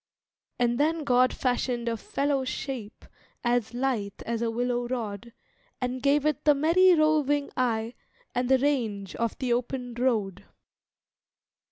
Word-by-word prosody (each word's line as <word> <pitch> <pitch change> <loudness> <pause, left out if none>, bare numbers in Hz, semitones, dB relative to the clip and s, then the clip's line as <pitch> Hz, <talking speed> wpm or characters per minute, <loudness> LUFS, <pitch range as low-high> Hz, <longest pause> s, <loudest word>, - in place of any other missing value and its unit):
And 240 0 +1
then 315 +2 +1
God 255 -2 +4
fashioned 245 -1 -1
a 230 - 0
fellow 275 +4 -1
shape 255 -4 -5 0.4
As 240 -1 0
lithe 240 -6 -2
as 230 0 -2
a 235 - 0
willow 245 +1 -1
rod, 235 -2 -4 0.5
And 250 0 -3
gave 280 +2 +2
it 305 -3 0
the 295 -1 +5
merry 350 +5 +5
roving 300 -2 +2
eye 230 -2 0 0.4
And 245 0 -1
the 265 - +6
range 230 -9 -1
of 230 -1 -1
the 250 -3 0
open 245 0 -3
road. 215 -6 -1
250 Hz, 140 wpm, -27 LUFS, 235-275 Hz, 0.5 s, the